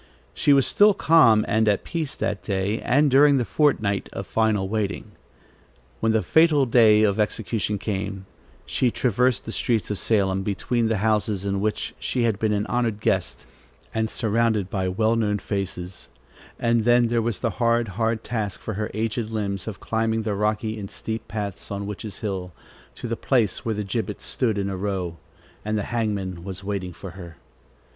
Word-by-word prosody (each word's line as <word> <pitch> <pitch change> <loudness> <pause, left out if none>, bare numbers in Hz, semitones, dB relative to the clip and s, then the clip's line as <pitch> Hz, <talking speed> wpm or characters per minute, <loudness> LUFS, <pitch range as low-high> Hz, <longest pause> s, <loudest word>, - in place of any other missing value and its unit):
She - - +2
was 140 -2 +5
still 205 -1 +5
calm 115 -13 +5
and 110 -1 +2
at 100 -2 +2
peace 160 -5 -3
that 100 - -2
day, 100 +2 -1
and 145 +4 +3
during 140 +1 +6
the 125 - 0
fortnight 110 -11 +1
of - - -5
final 110 -3 +1
waiting. 105 0 -3 0.9
When 115 - +2
the 110 -1 +2
fatal 160 -4 +4
day 110 -3 +5
of 100 0 +2
execution 105 0 -1
came, 100 -1 -4 0.4
she 125 - +1
traversed 125 +1 +1
the 115 - -5
streets 115 -2 0
of 105 - -2
Salem, 95 -3 +1
between 115 +4 -1
the 110 -1 +1
houses 105 -2 +1
in 100 0 -1
which 105 +1 -2
she 125 - -1
had 110 -3 +1
been 110 -1 +1
an 105 0 0
honored 115 -3 -1
guest, - - -1 0.5
and 110 0 0
surrounded 110 -4 0
by 95 -2 -1
well 110 +5 +1
known 105 -3 +1
faces, 95 -3 -4 0.5
and 115 -1 +2
then 120 0 +4
there 120 0 +1
was 115 -3 -1
the - - -1
hard, 115 -1 +2
hard 110 +3 -1
task, 110 -5 -3
for 110 - -5
her 105 +2 -3
aged 110 0 -2
limbs, 100 -3 -2
of 110 - -5
climbing 115 0 -1
the 105 -1 -1
rocky 105 +2 -1
and 100 -1 -6
steep 110 0 -5
path 105 -3 -5
on 100 0 -3
Witches' 105 0 -6
Hill 95 -4 -3 0.4
to - - -6
the 115 - -1
place 115 -6 +1
where 110 -2 -1
the 105 - -2
gibbets 105 0 -3
stood 115 -5 0
in 100 -1 -1
a 95 - -3
row, 95 -3 -3 0.5
and 110 0 -1
the 105 - -1
hangman 100 -6 -2
was 95 0 -7
waiting 95 -2 -3
for 95 +2 -9
her. 85 -2 -11
110 Hz, 180 wpm, -24 LUFS, 100-115 Hz, 0.9 s, during